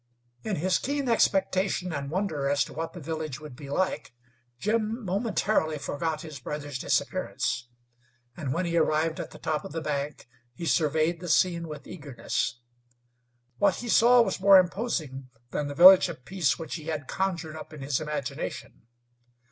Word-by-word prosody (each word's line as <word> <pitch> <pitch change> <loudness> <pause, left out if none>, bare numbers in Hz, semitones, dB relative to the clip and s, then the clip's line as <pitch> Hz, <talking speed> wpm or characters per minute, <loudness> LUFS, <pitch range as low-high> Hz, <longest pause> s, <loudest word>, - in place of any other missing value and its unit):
In 215 - -2
his 180 +4 +1
keen 280 0 -2
expectation 190 -5 +1
and 140 -1 -4
wonder 155 -6 -1
as 145 0 +3
to 145 - -10
what 165 +3 -4
the 180 - -8
village 155 -2 -4
would 150 -4 -10
be 140 +1 -10
like, 185 -4 -1 0.4
Jim 220 - -1
momentarily 195 -5 0
forgot 155 +2 -3
his 155 -3 -8
brother's 145 -2 -5
disappearance, 120 -1 -1 0.7
and 140 -4 -4
when 170 +6 0
he 170 0 0
arrived 160 0 +1
at - - -5
the - - -12
top 155 -1 -2
of - - -8
the 165 - -2
bank 145 -2 -3 0.3
he 170 - -6
surveyed 160 +1 +2
the 175 0 -6
scene 170 0 +2
with 150 -1 -8
eagerness. 135 -6 -3 1.0
What 200 -2 +4
he 240 - -6
saw 240 +2 +6
was 195 -3 -2
more 195 0 +8
imposing 170 - -1 0.2
than 145 - -2
the 145 - -6
Village 185 +2 +9
of 150 -7 -9
Peace 175 -5 +1
which 160 -3 -6
he 155 - -10
had 155 -4 -4
conjured 170 -5 -2
up 155 - -9
in 150 -2 -10
his 135 -1 0
imagination. 150 -5 -5
160 Hz, 170 wpm, -27 LUFS, 145-190 Hz, 1.0 s, Village